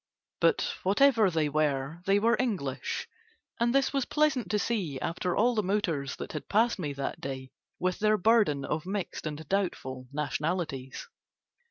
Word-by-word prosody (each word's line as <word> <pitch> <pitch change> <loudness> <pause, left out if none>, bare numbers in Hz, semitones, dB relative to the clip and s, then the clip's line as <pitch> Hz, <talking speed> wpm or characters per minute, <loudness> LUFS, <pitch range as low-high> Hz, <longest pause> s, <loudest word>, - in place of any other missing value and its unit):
But - - +2
whatever 220 +1 +4
they 160 -3 +1
were 145 +1 0
they 195 +1 +5
were 230 +3 +3
English, 185 - -2 0.5
and 235 0 +3
this 275 0 +3
was 275 -3 +1
pleasant 300 -5 +1
to 210 - +2
see 195 - -1
after 175 +4 -2
all 240 +4 +4
the 215 - +1
motors 180 -9 -1
that - - -7
had 150 - -6
passed 225 +1 +3
me 150 -5 -2
that 140 0 -4
day 130 -1 -5 0.3
with 180 0 -1
their 215 0 +3
burden 205 -9 +3
of 155 +3 -3
mixed 195 -4 -3
and 155 0 -6
doubtful 130 -10 -2
nationalities. 150 - -3
180 Hz, 160 wpm, -29 LUFS, 145-215 Hz, 0.5 s, they